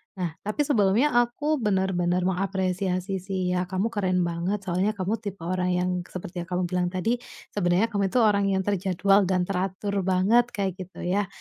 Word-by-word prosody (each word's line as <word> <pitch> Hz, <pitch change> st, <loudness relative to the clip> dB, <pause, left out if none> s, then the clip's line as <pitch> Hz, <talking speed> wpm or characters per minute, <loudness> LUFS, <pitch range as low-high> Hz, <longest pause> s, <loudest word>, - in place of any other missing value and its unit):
Nah, 180 Hz, -4 st, -2 dB, 0.2 s
tapi 215 Hz, +8 st, +1 dB
sebelumnya 235 Hz, +1 st, +3 dB
aku 245 Hz, +5 st, +1 dB
bener-bener 190 Hz, -4 st, +1 dB
mengapresiasi 190 Hz, 0 st, -1 dB
sih 185 Hz, -1 st, -2 dB
ya, 180 Hz, 0 st, 0 dB
kamu 190 Hz, +4 st, 0 dB
keren 185 Hz, -4 st, +1 dB
banget, 175 Hz, +4 st, -2 dB
soalnya 190 Hz, +4 st, 0 dB
kamu 200 Hz, +3 st, -1 dB
tipe 200 Hz, -5 st, -7 dB
orang 180 Hz, +1 st, 0 dB
yang 180 Hz, +1 st, 0 dB, 0.2 s
seperti 180 Hz, 0 st, -7 dB
yang -, -, -14 dB
kamu 180 Hz, 0 st, 0 dB
bilang 180 Hz, -1 st, +1 dB
tadi, 210 Hz, +7 st, -1 dB, 0.3 s
sebenarnya 195 Hz, +3 st, +1 dB
kamu 200 Hz, -2 st, +1 dB
itu 245 Hz, -, +1 dB
orang 200 Hz, -2 st, +3 dB
yang 190 Hz, -1 st, +1 dB
terjadwal 195 Hz, 0 st, +2 dB
dan 185 Hz, -1 st, +2 dB
teratur 190 Hz, +2 st, -2 dB, 0.2 s
banget 200 Hz, +6 st, +4 dB
kayak 195 Hz, -2 st, 0 dB
gitu 185 Hz, 0 st, -8 dB
ya, 195 Hz, +2 st, 0 dB
190 Hz, 175 wpm, -26 LUFS, 180-205 Hz, 0.3 s, banget